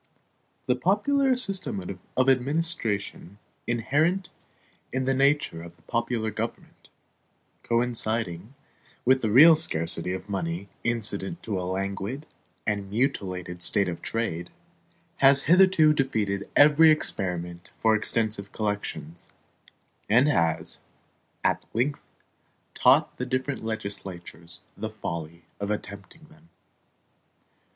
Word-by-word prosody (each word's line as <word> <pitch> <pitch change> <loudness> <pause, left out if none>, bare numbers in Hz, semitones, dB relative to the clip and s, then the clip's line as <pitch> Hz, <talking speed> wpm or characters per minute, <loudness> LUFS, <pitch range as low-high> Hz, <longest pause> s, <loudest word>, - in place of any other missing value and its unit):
The 125 - +2
popular 255 - +2
system 180 - -4 0.2
of 130 0 +3
administration 130 - -1 0.3
inherent 150 +11 0 0.6
in 130 0 -1
the 135 - +2
nature 140 - +1
of 85 0 -13
popular 115 -2 -1
government, - - -6 0.7
coinciding 115 -3 -1 0.5
with 130 +1 +4
the 110 - 0
real 155 +9 +8
scarcity 85 - -1
of 95 +1 -5
money 95 -1 -3
incident 115 - -3
to 100 -4 -2
a 90 0 -3
languid 100 +8 -3 0.4
and 100 -2 -2
mutilated 95 -7 -2
state 100 +2 +4
of 85 -1 -5
trade, 90 -7 -3 0.7
has 135 0 +5
hitherto 175 -2 +5
defeated 105 -8 -1
every 150 +2 +7
experiment 90 - -1
for 110 -1 +4
extensive 105 -2 -1
collections, 105 -6 -4 0.8
and 125 +7 +5
has 85 - 0 0.6
at - - +1
length 140 +5 0 0.7
taught - - +4
the 125 - -3
different 130 +1 -2
legislatures 95 -6 -5
the 110 +1 -4
folly 85 -6 -6 0.2
of 100 0 -3
attempting 105 +7 -6
them. 165 +1 -21
110 Hz, 105 wpm, -26 LUFS, 95-135 Hz, 0.8 s, real